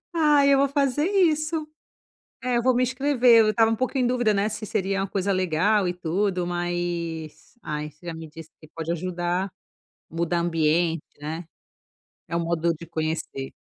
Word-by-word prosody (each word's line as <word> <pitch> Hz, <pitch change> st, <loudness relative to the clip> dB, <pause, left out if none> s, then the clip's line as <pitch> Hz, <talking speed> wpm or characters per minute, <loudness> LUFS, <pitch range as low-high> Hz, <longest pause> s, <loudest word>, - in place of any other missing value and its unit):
Ai, 295 Hz, -3 st, +4 dB
eu -, -, +3 dB
vou 280 Hz, +1 st, +3 dB
fazer 280 Hz, +1 st, +1 dB
isso. 315 Hz, -5 st, +1 dB, 0.7 s
É, 250 Hz, -1 st, +1 dB
eu -, -, 0 dB
vou 255 Hz, +1 st, +3 dB
me 250 Hz, -, +2 dB
inscrever, 255 Hz, -2 st, +4 dB
eu 220 Hz, -, +4 dB
estava 225 Hz, +1 st, +3 dB
um -, -, +2 dB
pouco 255 Hz, +4 st, -2 dB
em 255 Hz, -2 st, +2 dB
dúvida, 245 Hz, -3 st, +2 dB
né, 200 Hz, +2 st, +1 dB
se 215 Hz, +1 st, -5 dB
seria 195 Hz, 0 st, -1 dB
uma 195 Hz, -, -1 dB
coisa 195 Hz, +1 st, 0 dB
legal 185 Hz, +2 st, +2 dB
e 175 Hz, -, -2 dB
tudo, 180 Hz, +1 st, -1 dB
mas, 175 Hz, -1 st, -4 dB
ai, 150 Hz, 0 st, -4 dB
você 150 Hz, +4 st, -25 dB
já 170 Hz, -, -4 dB
me 160 Hz, -1 st, -8 dB
disse 160 Hz, +1 st, -12 dB
que 155 Hz, -, -15 dB
pode 165 Hz, 0 st, -2 dB
ajudar, 175 Hz, +2 st, -2 dB, 0.6 s
mudar 170 Hz, +1 st, -1 dB
ambiente, 165 Hz, -1 st, +1 dB, 0.2 s
né? 160 Hz, +4 st, -5 dB, 0.8 s
É 170 Hz, -, -2 dB
um -, -, +1 dB
modo 170 Hz, 0 st, +1 dB
de 165 Hz, +1 st, -10 dB
conhecer. 155 Hz, -4 st, -3 dB
180 Hz, 180 wpm, -25 LUFS, 165-245 Hz, 0.8 s, Ai